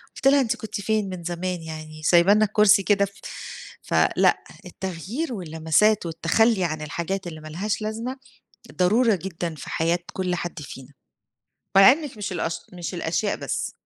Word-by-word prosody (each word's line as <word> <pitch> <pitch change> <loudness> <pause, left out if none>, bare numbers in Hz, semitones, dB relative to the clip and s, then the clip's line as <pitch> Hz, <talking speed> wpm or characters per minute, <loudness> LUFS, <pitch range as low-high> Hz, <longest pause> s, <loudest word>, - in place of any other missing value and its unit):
قُلت 270 - 0
لها 280 0 +6
أنتِ 230 - 0
كُنتِ 210 -2 -6
فين 215 -2 0
من 180 -2 -7
زمان 175 +1 -3
يعني؟ 155 -1 -8
سايبة 175 +4 +5
لنا 215 +1 +4
الكرسي 210 -1 +5
كده 200 0 +3
ف 200 - -11 0.7
فلأ، - - +2 0.2
التغيير 190 - -5
واللمسات 175 +3 +1
والتخلّي 180 +6 +2
عن 155 -2 -2
الحاجات 170 +5 -3
اللي 160 -2 -8
مالهاش 190 +8 -3
لازمة 225 +5 -4 0.6
ضرورة 220 +5 +3
جدًا 170 -2 -5
في 145 - -9
حياة 165 +2 +1
كل 185 -1 -1
حد 170 -2 -5
فينا. 135 0 -10 0.8
مع 195 +6 +9
إنِك 295 -5 -5
مش 205 -2 -4
الأش 165 -1 -2 0.2
مش 175 +1 -5
الأشياء 175 +4 -1
بس. - - -3
185 Hz, 155 wpm, -24 LUFS, 165-215 Hz, 0.8 s, مع